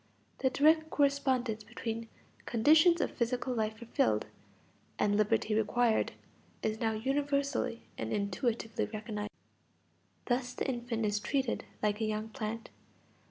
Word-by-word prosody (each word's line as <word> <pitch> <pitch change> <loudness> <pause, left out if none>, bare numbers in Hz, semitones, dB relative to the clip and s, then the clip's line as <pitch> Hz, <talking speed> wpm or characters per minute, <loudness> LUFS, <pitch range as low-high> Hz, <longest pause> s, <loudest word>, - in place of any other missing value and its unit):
The 260 - +3
direct 315 +4 +4
correspondence 260 -6 +1
between 230 0 -5 0.4
"conditions 315 +9 +5
of - - 0
physical 250 +1 -1
life 220 -2 -1
fulfilled" 115 - +1 0.7
and 205 0 +2
"liberty 215 +1 +2
acquired" 225 +1 +2 0.5
is 220 0 -1
now 225 -1 +1
universally 280 +1 0 0.2
and - - -3
intuitively 220 +2 -1
recognized. 215 -1 -4 1.0
Thus 250 0 0
the - - -2
infant 240 -3 -2
is 205 0 +1
treated 265 +2 -1 0.2
like 210 +1 +1
a - - +2
young 215 +1 -2
plant. 220 +1 -5
230 Hz, 120 wpm, -32 LUFS, 215-265 Hz, 1.0 s, conditions